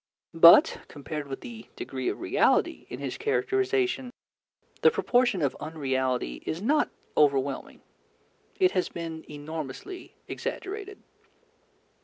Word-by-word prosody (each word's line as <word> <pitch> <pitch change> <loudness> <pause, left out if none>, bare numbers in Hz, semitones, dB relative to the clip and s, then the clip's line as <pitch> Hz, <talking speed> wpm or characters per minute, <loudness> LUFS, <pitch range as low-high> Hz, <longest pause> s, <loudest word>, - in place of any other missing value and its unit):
But, 165 +1 +8
compared 150 0 -6
with 135 -1 -6
the 115 -1 -10
degree 130 -2 -3
of - - -4
reality 360 - +1
in - - -6
his - - -5
characterization, 390 - 0 0.7
the - - +7
proportion 245 - +1
of 140 - 0
unreality 130 - -2
is 160 - -3
not 290 +10 +2 0.3
overwhelming. 140 -2 +1 0.8
It 370 -1 +4
has 185 - 0
been 165 -1 -6
enormously 155 - -7
exaggerated. 410 -4 -6
160 Hz, 110 wpm, -27 LUFS, -, 0.8 s, But